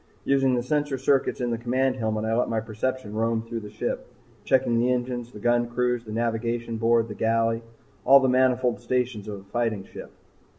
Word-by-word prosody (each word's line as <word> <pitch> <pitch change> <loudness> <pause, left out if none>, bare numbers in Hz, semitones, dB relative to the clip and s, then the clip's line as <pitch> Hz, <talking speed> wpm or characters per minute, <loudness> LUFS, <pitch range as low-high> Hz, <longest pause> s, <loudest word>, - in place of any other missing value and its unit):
Using 135 -2 +3
the 120 - -1
sensor 145 +1 0
circuits 135 0 +1
in 120 -1 0
the 115 - -2
command 130 +2 0
helmet, 110 -2 -1
I 110 - 0
let 120 - +1
my 115 - 0
perception 110 +1 -3
roam 115 +1 0
through 115 0 -5
the 105 -1 -9
ship, - - -4 0.4
checking 120 -3 +2
the 125 +2 +2
engines, 120 -1 -2
the - - -11
gun 120 +2 +2
crews, 125 0 -1
the 110 - -8
navigation 115 +1 -2
board, 115 0 +3
the 105 - -6
galley 115 +1 +1 0.4
all 135 +5 +8
the 135 - +2
manifold 125 -1 +2
stations 120 -3 -1
of 100 -2 -6
a - - -18
fighting 110 0 -2
ship. - - -10
120 Hz, 200 wpm, -25 LUFS, 115-125 Hz, 0.4 s, all